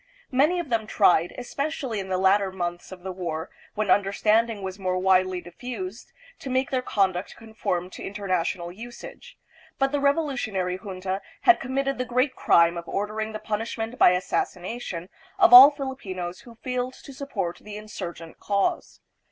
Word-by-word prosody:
Many 300 +7 +3
of 345 - -4
them 225 -2 0
tried, 175 -5 +3
especially 265 -2 -3
in 190 -1 -6
the 185 - 0
latter 190 +1 +3
months 175 -1 -4
of 180 -1 -10
the 190 - -4
war, 170 -3 -4 0.2
when 215 0 0
understanding 210 +2 +2
was 190 +1 -5
more 185 -1 -1
widely 185 -1 +2
diffused, 195 +2 -7 0.3
to 270 - -7
make 260 +1 0
their 260 -1 +1
conduct 195 -6 0
conform 220 -6 -3
to - - -9
international 185 -3 -2
usage; 235 +6 -11 0.4
but 270 0 +1
the 290 - 0
revolutionary 265 - 0
junta 190 0 -4 0.2
had 360 - +6
committed 275 +1 -2
the 255 - 0
great 255 +2 +1
crime 170 0 +4
of 170 - -11
ordering 215 +2 -3
the 215 - -4
punishment 225 +2 -4
by 180 - +7
assassination 180 0 -3 0.3
of 360 -7 +6
all 260 +3 +13
Filipinos 200 - -5
who 235 -1 -14
failed 250 +2 -3
to 275 - -12
support 210 -11 -4
the 210 0 -8
insurgent 175 -6 -8
cause. 200 -1 -1
210 Hz, 160 wpm, -25 LUFS, 185-250 Hz, 0.4 s, all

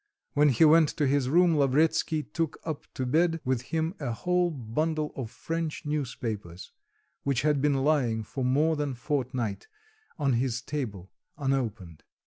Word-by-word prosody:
When 150 +1 +5
he 135 +5 +5
went 160 0 +6
to 150 - +2
his 135 -1 +1
room, 170 +2 +4
Lavretsky 155 +2 +2
took 165 -1 -3
up 155 -3 -5
to 130 - -2
bed 165 +5 +2
with 130 -2 +1
him 160 +1 0
a 135 -5 -2
whole 180 +8 +1
bundle 155 +3 -2
of 125 -5 -5
French 165 +4 -4
newspapers, 115 - -4 0.5
which 140 -2 0
had 150 -2 +2
been 140 -2 +2
lying 125 -7 +2
for 130 +4 -5
more 150 +6 +2
than 145 -3 -2
fortnight 125 -6 -2 0.5
on 140 -5 +1
his 125 0 0
table 110 -12 -5 0.3
unopened. 115 - -2
140 Hz, 150 wpm, -28 LUFS, 125-155 Hz, 0.5 s, went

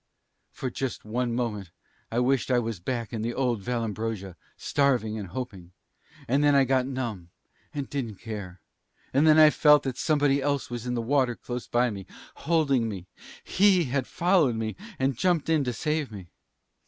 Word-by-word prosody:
"For 130 - -5
just 130 -4 -4
one 120 +2 -1
moment 105 -6 -3 0.4
I 115 - -2
wished 130 +2 +2
I 125 - +3
was 115 -5 -2
back 115 +5 -4
in 110 - -2
the 120 +2 -2
old 125 -5 0
Vallambrosa, 110 -4 -3 0.2
starving 125 -7 +1
and 100 - -6
hoping. 95 -4 -7 0.5
And 140 +4 +2
then 145 -1 +5
I 140 - +6
got 130 0 +1
numb, 115 -10 -4 0.4
and 140 -2 -4
didn't 120 -7 -4
care. 100 -5 -7 0.5
And 140 +4 +4
then 155 0 +7
I 155 -1 +8
felt 150 -1 +5
that 130 -2 -4
somebody 145 -3 +2
else 140 -2 -1
was 120 0 -5
in 125 - -1
the 115 - -1
water 130 -1 +2
close 120 +1 -6
by 120 0 +2
me, 100 -2 -8 0.3
holding 140 -7 +1
me 100 -4 -5
up. - - -19 0.4
He 190 -2 +4
had 130 -2 0
followed 170 -8 +2
me, 110 -1 -3 0.2
and 135 0 0
jumped 170 +3 +1
in 160 -3 +3
to 125 - 0
save 150 +1 -2
me. 95 -5 -9
125 Hz, 180 wpm, -27 LUFS, 110-140 Hz, 0.5 s, I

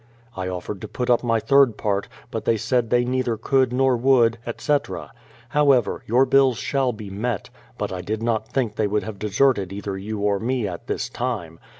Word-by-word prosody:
I 95 -1 -3
offered 90 +1 -5
to - - -5
put 125 0 -1
up 120 - +3
my 115 -1 +2
third 135 -2 +4
part, 100 -1 -1 0.2
but - - -3
they 115 - +3
said 120 +1 0
they 120 0 +3
neither 125 -2 0
could 130 +2 +2
nor 130 0 +3
would, 120 -2 +3
etc. 145 +5 -2 0.4
However, 140 -3 +3
your 125 +4 +4
bills 135 -2 +4
shall 135 -3 0
be 105 -3 -9
met; 110 +1 -3 0.3
but - - -3
I 90 - -4
did 110 +4 -3
not 115 -2 0
think 115 -5 -1
they 105 - +2
would 105 +1 0
have 110 -3 -7
deserted 105 -2 +2
either 100 -1 -5
you 105 +2 -5
or 100 -1 +1
me 120 -1 -1
at 85 -3 -7
this - - -2
time. 105 -10 -4
115 Hz, 200 wpm, -23 LUFS, 105-130 Hz, 0.4 s, third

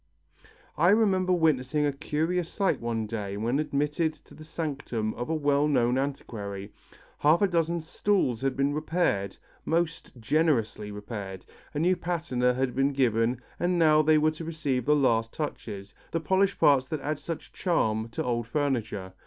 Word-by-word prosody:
I 175 +3 +5
remember 195 -3 +3
witnessing 150 -4 +2
a 145 - +1
curious 160 +4 -1
sight 195 -2 0
one 115 -1 -2
day 105 -2 -4
when 120 +6 0
admitted 150 +2 0
to - - -19
the 155 - -12
sanctum 140 -9 -3
of 120 +4 -5
a 160 - +1
well 145 -1 +2
known 125 -3 +2
antiquary. 105 -8 -5 0.5
Half 155 +6 +4
a - - +5
dozen 170 -1 0
stools 160 - 0
had 135 -1 -1
been 140 +1 +1
repaired, 150 - 0 0.3
most 165 -4 -2
generously 115 -6 +1
repaired, 100 -3 -7 0.3
a - - -1
new 175 +4 +3
patina 155 -9 0
had 130 -1 0
been 135 +1 +2
given 120 -2 +1 0.2
and 175 0 +1
now 155 -2 +5
they 155 0 +4
were 155 +1 +3
to 155 +1 -8
receive 145 -6 -2
the 150 - +4
last 115 -5 +2
touches, 100 -9 -5 0.2
the 165 - -1
polished 190 +5 +1
parts 135 -2 +4
that 155 -1 -4
add 150 +1 -2
such 165 -2 -7
charm 110 - 0
to 115 - -3
old 120 -2 -1
furniture. 115 -9 -2
145 Hz, 165 wpm, -27 LUFS, 115-160 Hz, 0.5 s, I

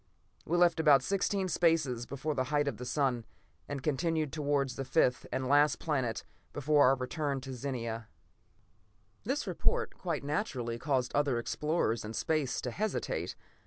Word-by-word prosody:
"We 175 - +1
left 175 -2 +4
about 145 -5 +6
sixteen 195 +2 0
spaces 160 -9 +1
before 140 +3 -3
the 130 -2 0
height 145 0 +1
of 140 - -2
the 125 - -6
sun, 130 -4 0 0.5
and 140 -2 -4
continued 155 0 0
towards 145 -4 0
the 135 - -3
fifth 125 -2 +2
and 130 -1 -1
last 145 +1 +4
planet 130 -8 -1 0.3
before 145 -1 +4
our 135 - +5
return 135 +2 -2
to 135 0 -7
Zenia." 115 -4 -4 1.2
This 270 +6 -1
report, 470 -4 0
quite 165 -7 -2
naturally, 130 - -2
caused 130 -4 0
other 140 -4 +2
explorers 120 -1 0
in 105 +1 -6
space 155 -5 0
to 125 - -3
hesitate. 215 - -2
145 Hz, 155 wpm, -31 LUFS, 130-160 Hz, 1.2 s, about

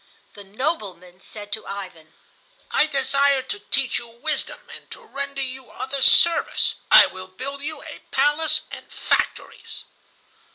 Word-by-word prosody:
The 205 - -12
"nobleman" 195 - -4
said 205 0 -10
to 220 - -5
Ivan: 180 -6 -8 0.6
"I 305 - +4
desire 275 -1 +2
to 205 - -6
teach 250 +5 0
you 235 - -11
wisdom 255 +7 -4
and - - -15
to - - -9
render 280 0 -4
you 260 -1 -7
other 270 +1 -4
service. 340 +5 +5
I - - +10
will 185 0 -8
build 275 +9 -6
you 310 +2 -6
a - - -9
palace 300 +2 +3
and - - -10
factories." - - -2
260 Hz, 140 wpm, -23 LUFS, 205-280 Hz, 0.6 s, I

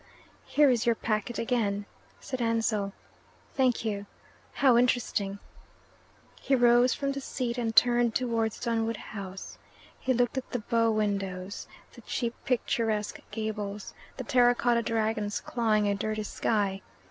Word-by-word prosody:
"Here 290 -2 +5
is 240 -2 0
your 235 - +4
packet 215 +1 -2
again," 210 -4 0 0.3
said 260 -2 -5
Ansell. 225 -3 +1 0.6
"Thank 255 -4 +1
you. 205 -2 -2 0.4
How 260 -4 +4
interesting!" 235 -5 +1 1.0
He 270 - +2
rose 245 0 +5
from 275 -1 -1
the 275 0 -4
seat 250 -3 -3
and 225 -2 -1
turned 240 -2 +5
towards 230 -3 0
Dunwood 230 -1 -1
House. 195 -3 -8 0.4
He 260 - -1
looked 245 +1 +1
at 260 - -12
the 250 - -1
bow 230 0 +1
windows, 200 -2 -2 0.3
the - - -13
cheap 235 -2 -2
picturesque 225 -4 0
gables, 210 -2 -4 0.2
the - - -4
terracotta 245 -3 +3
dragons 220 -2 -1
clawing 215 -3 +1
a 200 - +2
dirty 215 +1 -2
sky. 200 -2 -1
225 Hz, 135 wpm, -28 LUFS, 210-245 Hz, 1.0 s, Here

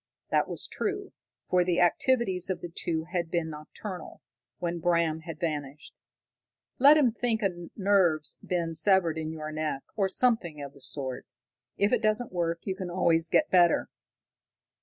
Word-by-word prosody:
That - - +2
was - - -3
true, - - -3 0.4
for 180 -1 +3
the 175 -1 +1
activities 190 0 +2
of 185 -2 -2
the 175 - -6
two 165 -1 -2
had 175 -3 -1
been 170 -2 -1
nocturnal, 160 +4 -8 0.4
when 170 -1 -3
Bram 170 -2 +1
had 160 -1 -8
vanished. 150 -3 -4 0.9
"Let 285 +4 +8
him 265 -6 +4
think 230 -1 -1
a 175 -3 -2
nerve's 190 -6 +2
been 170 -2 -1
severed 170 -1 +3
in 155 0 -3
your 155 -1 -6
neck, 155 -3 -3
or 195 -3 +1
something 205 -11 +1
of 140 -1 -7
the 140 - -18
sort. 130 -1 -4 0.5
If 200 +4 +2
it 240 - +3
doesn't 215 0 0
work, 170 -1 -1
you 190 - -3
can 185 -2 -5
always 170 -2 +2
get 310 - +2
better." 175 -2 +4
175 Hz, 160 wpm, -28 LUFS, 160-195 Hz, 0.9 s, Let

